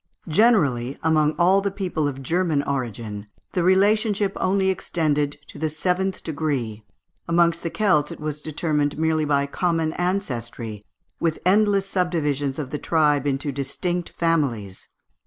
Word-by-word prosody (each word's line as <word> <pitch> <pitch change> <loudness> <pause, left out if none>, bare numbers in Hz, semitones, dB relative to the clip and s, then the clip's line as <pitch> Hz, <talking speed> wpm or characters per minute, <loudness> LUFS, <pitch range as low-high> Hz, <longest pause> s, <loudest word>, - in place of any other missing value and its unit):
Generally, 150 - +3
amongst 155 -1 +2
all 185 +3 +5
the 200 - 0
people 180 -6 -2
of 135 -1 -5
German 165 -1 +1
origin, 115 -6 -4 0.2
the 180 - 0
relationship 200 +2 +3
only 190 0 +1
extended 150 -5 -1
to - - -11
the 160 0 0
seventh 185 +4 -1
degree; 140 -9 -2 0.4
amongst 170 0 +3
the 165 - -2
Celts 180 -7 +2
it - - -8
was 150 -1 -4
determined 150 -2 -1
merely 160 -1 +1
by 140 -1 +2
a - - -4
common 165 +1 0
ancestry, 120 - -3 0.4
with 165 -2 0
endless 200 +1 +3
subdivisions 150 -8 -1
of 140 -4 -5
the 150 - -3
tribe 150 -3 +2
into 140 +1 -1
distinct 170 +6 -3
families. 135 - -1
155 Hz, 140 wpm, -23 LUFS, 140-180 Hz, 0.4 s, all